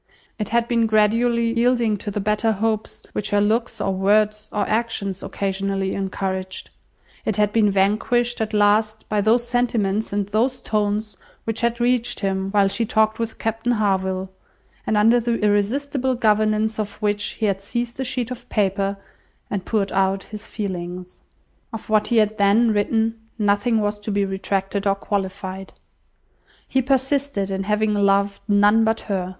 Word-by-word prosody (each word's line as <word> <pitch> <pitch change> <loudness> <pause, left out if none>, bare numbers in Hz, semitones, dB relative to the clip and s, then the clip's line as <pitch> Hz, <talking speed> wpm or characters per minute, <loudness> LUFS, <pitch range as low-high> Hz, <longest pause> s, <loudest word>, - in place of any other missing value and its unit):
It 210 - -3
had 235 +1 +1
been 230 -2 +2
gradually 230 +2 +2
yielding 235 -2 +2
to 205 - -6
the 205 - -3
better 210 +2 +1
hopes 215 +1 -2
which 210 - -1
her 205 - +2
looks, 225 +3 0
or 195 - 0
words, 210 +2 +1
or 205 -1 -1
actions 215 -4 -1
occasionally 195 0 -2
encouraged; 190 -1 -4 0.5
it 220 - -1
had 210 0 +1
been 215 -2 +4
vanquished 215 +5 +1
at 220 - -1
last 215 +1 +2
by 210 -1 +1
those 235 +3 +2
sentiments 225 -4 0
and 200 0 0
those 230 +6 0
tones 210 -1 -1 0.3
which 225 +1 -3
had 235 0 0
reached 240 0 +1
him 190 -1 -1
while 200 -1 +3
she 195 +4 -1
talked 220 -1 +1
with 230 -1 -3
Captain 225 +2 -1
Harville; 190 -3 0 0.6
and 215 - +2
under 225 +3 +5
the 235 0 0
irresistible 255 +6 0
governance 215 -1 +1
of 205 -1 -3
which 205 -1 -1
he 220 - -2
had 195 -2 0
seized 235 +4 -4
a - - 0
sheet 250 -1 -3
of 250 0 -8
paper, 195 -1 0 0.5
and 195 -3 -3
poured 200 -3 0
out 195 0 +1
his 215 +1 -9
feelings. 180 -3 -6 0.5
Of 225 -1 -8
what 215 -1 +3
he 235 - +1
had 215 0 +2
then 210 +4 +4
written, 225 +2 0 0.2
nothing 210 +2 +2
was 205 0 -1
to 210 - -6
be 200 0 +1
retracted 195 +1 -2
or 195 - +3
qualified. 195 -1 -4 0.9
He 265 - +1
persisted 265 -5 0
in 190 0 -2
having 210 +1 +1
loved 200 0 +2
none 205 +2 +4
but 225 0 +1
her. 185 -3 -3
210 Hz, 165 wpm, -22 LUFS, 200-230 Hz, 0.9 s, under